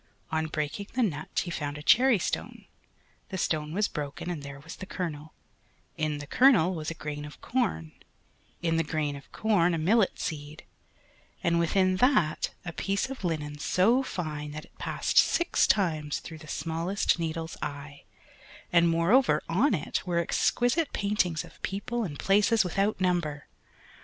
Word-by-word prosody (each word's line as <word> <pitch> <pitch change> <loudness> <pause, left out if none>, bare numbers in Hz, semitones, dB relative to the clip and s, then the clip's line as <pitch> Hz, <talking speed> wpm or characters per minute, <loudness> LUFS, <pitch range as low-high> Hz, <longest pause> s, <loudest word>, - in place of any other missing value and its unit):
On 160 0 0
breaking 155 +6 -3
the 250 +1 +2
nut 155 -8 -2
he 175 - -6
found 145 -3 -3
a 150 - -9
cherry 250 - +5
stone, 180 - -4 0.6
the 190 - -4
stone 155 -3 -1
was 205 +5 +1
broken 150 +4 -5
and 160 -4 -4
there 140 0 -8
was 165 +3 -10
the 190 - -8
kernel, 155 -5 -5 0.6
in 155 -1 -1
the 145 - -7
kernel 195 - +5
was 155 -3 -4
a 165 - -5
grain 150 -1 -5
of 150 0 -10
corn, 80 - -1 0.7
in 165 -1 +2
the 165 - +2
grain 150 -3 -2
of 140 - -12
corn 180 -6 +2
a - - -1
millet 195 +6 +2
seed, 150 -1 -5 0.8
and 170 0 +2
within 185 +2 +2
that 245 - +3 0.2
a 175 - -5
piece 200 +9 -1
of 265 - -7
linen 150 -4 -2
so 215 - +3
fine 150 - -4
that 155 0 -7
it - - -28
passed - - +2
six 345 0 +3
times 155 -7 +1
through 160 -1 -10
the 155 - -12
smallest 165 +4 0
needle's 165 0 -3
eye, 145 -1 -6 0.7
and 170 -1 +5
moreover 175 +11 +3
on 205 - +3
it 150 - -2
were 175 -1 0
exquisite 245 - +1
paintings 200 -6 0
of - - -16
people 220 +5 -2
and 150 -8 -5
places 210 +5 +3
without 195 +4 0
number. 175 -6 0
170 Hz, 165 wpm, -28 LUFS, 150-200 Hz, 0.8 s, cherry